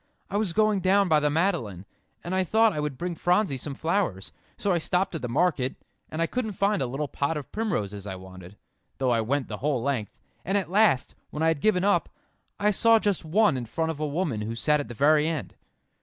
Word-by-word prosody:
"I 200 - 0
was 210 -4 0
going 215 +1 +2
down 195 +1 +3
by 155 -1 +5
the 150 0 +1
Madeleine, 145 - -1 0.4
and 175 - -4
I 190 0 +2
thought 220 +4 +3
I 150 - -3
would 150 -3 -3
bring 175 +3 -3
Phronsie 175 -1 +1
some 135 +2 -5
flowers; 160 - -1 0.3
so 200 - 0
I 175 - +2
stopped 180 +4 0
at 165 - -4
the 125 - -4
market, 140 -1 +1 0.3
and 160 +1 -1
I - - +3
couldn't 220 +3 -3
find 200 -2 +1
a 130 - 0
little 140 +4 -3
pot 140 +3 -2
of 145 - -8
primroses 105 - -3
I 95 - -4
wanted, 95 +1 -12 0.4
though 130 -2 +1
I 115 -1 +2
went 130 +4 -1
the 105 - -5
whole 135 -3 -1
length; 130 -7 -2 0.3
and 195 +3 0
at 180 -4 -3
last, 200 -10 +3 0.2
when 155 - -3
I 160 - +4
had 160 -3 -1
given 190 -3 +2
up, 200 +1 +2 0.5
I 210 +1 +3
saw 230 +3 +5
just 205 -4 0
one 200 +2 +3
in 120 -2 -4
front 160 +8 -1
of 155 - -8
a 155 - -1
woman 145 - -2
who 110 +2 -4
sat 150 +5 +2
at 145 - -4
the 120 - -8
very 150 +4 +4
end." 160 -4 -3
155 Hz, 230 wpm, -26 LUFS, 130-195 Hz, 0.5 s, by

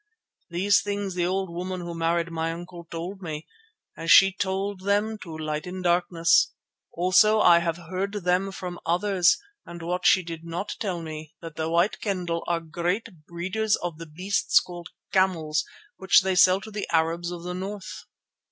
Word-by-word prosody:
These 185 +4 +3
things 200 -1 -3
the 175 -1 0
old 190 -1 -1
woman 180 +1 -4
who 170 0 -6
married 170 0 0
my 165 0 -2
uncle 170 0 -9
told 180 +4 -6
me, 155 -3 -5 0.5
as 165 - -5
she 195 0 +8
told 195 +1 -2
them 205 +3 0
to 165 -5 -8
Light 155 +1 -3
in 185 +1 -6
Darkness, 175 -1 +3 0.4
also 190 +5 +4
I 170 -4 +7
have 170 -1 -1
heard 185 +4 -4
them 190 -1 0
from 180 -2 -6
others, 180 +1 +3 0.3
and 170 -1 -9
what 180 +1 0
she 185 - +5
did 165 -1 -7
not 170 +4 -4
tell 180 -5 -3
me, 155 -1 -8
that 165 -2 -9
the 160 0 -2
White 170 +5 +2
Kendah 180 -5 -2
are 170 -1 0
great 175 +7 -2 0.2
breeders 190 +5 0
of 170 -3 -5
the 165 - -8
beasts 185 +6 +2
called 175 -1 -9 0.2
camels 170 -5 +2 0.3
which 190 0 +5
they 190 0 0
sell 185 +1 +5
to 220 - -10
the 210 -1 -4
Arabs 165 +1 +1
of 175 -1 -7
the 180 0 -4
north. 195 +2 -6
175 Hz, 175 wpm, -26 LUFS, 170-190 Hz, 0.5 s, she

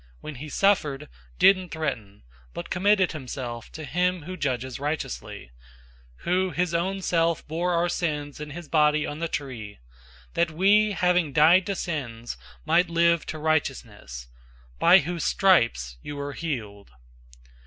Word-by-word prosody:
When 155 - -7
he 155 - -7
suffered, 150 -7 +1 0.3
didn't 185 - +4
threaten, 120 - -4 0.3
but - - -7
committed 190 0 +3
himself 125 -5 -6
to 155 - -7
him 180 +2 0
who 185 +4 -6
judges 130 -5 -3
righteously; 65 - -5 0.7
002:024 - - -19
who 185 +2 +1
his 170 +1 -1
own 190 +3 -1
self 165 -1 +1
bore 170 +3 -1
our 170 +1 +2
sins 150 -5 -3
in 150 0 -6
his 165 +2 -8
body 150 -1 +3
on 145 - -5
the 165 - -1
tree, 120 -10 -6 0.6
that 170 0 +1
we, 200 +6 +3
having 180 -5 +1
died 170 +6 +5
to 200 - -1
sins, 120 -10 -4 0.3
might 170 +3 +3
live 170 -1 +2
to 155 - -4
righteousness; 125 - -2 0.5
by - - +7
whose 170 +1 -2
stripes 115 - +2
you 145 - -7
were 140 0 -5
healed. 110 - -5
155 Hz, 145 wpm, -25 LUFS, 135-175 Hz, 0.7 s, by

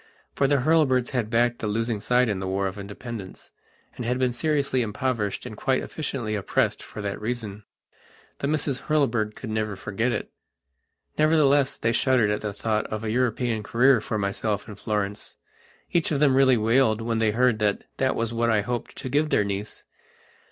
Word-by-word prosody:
For 140 - +2
the 140 -1 +2
Hurlbirds 135 -4 +3
had 125 -5 -1
backed 120 +1 +2
the 110 - -3
losing 115 +1 -1
side 125 +4 +2
in 100 -3 -1
the 95 - -4
War 95 +1 -1
of 95 +2 -4
Independence, 100 0 -8 0.4
and - - -5
had 125 +2 0
been 130 -1 +1
seriously 140 -1 +1
impoverished 115 -2 -2
and 110 - -7
quite 130 +4 0
efficiently 130 -8 -4
oppressed 100 -3 0
for 105 - -8
that 100 0 -4
reason. 110 -3 -4 0.7
The 140 - -1
Misses 145 -3 0
Hurlbird 120 -8 +1
could 110 - -7
never 110 -1 -1
forget 100 +6 -2
it. - - -4 0.9
Nevertheless 145 -3 +4
they 115 - 0
shuddered 120 -3 +3
at 105 - -1
the 105 - -3
thought 110 +1 -1
of 110 0 -5
a 110 - -2
European 120 -1 0
career 125 +3 +3
for 110 - -3
myself 105 +1 -2
and 105 -2 -10
Florence. 105 -1 -3 0.6
Each 170 -2 +1
of 145 - +1
them 140 -2 +4
really 130 -1 +5
wailed 115 0 +3
when 115 0 -1
they 110 -1 +3
heard 120 0 +2
that 105 -1 0
that 130 0 +1
was 115 0 -2
what 115 0 +1
I 110 -2 +3
hoped 120 +2 -4
to - - -6
give 150 +4 +1
their 105 - +3
niece. 100 +1 -5
115 Hz, 185 wpm, -25 LUFS, 105-130 Hz, 0.9 s, really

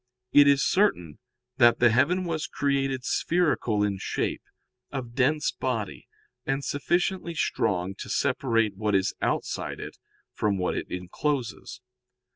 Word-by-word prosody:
"It 145 0 +8
is 140 -1 +4
certain 90 - +1 0.4
that 120 -1 +6
the 120 -2 +5
heaven 145 +10 +2
was 160 -2 -2
created 135 -2 -1
spherical 150 -13 +1
in 100 -2 -1
shape, - - -2 0.5
of 125 -4 -5
dense 140 +4 +2
body, 110 - -4 0.4
and 135 +1 -2
sufficiently 175 +3 -1
strong 95 - 0
to - - -7
separate 115 -6 +1
what 105 0 0
is 95 +1 +1
outside - - -2
it - - -8 0.3
from 105 -2 0
what 90 -1 -1
it - - -3
encloses. 120 +9 -3
130 Hz, 130 wpm, -26 LUFS, 105-145 Hz, 0.5 s, It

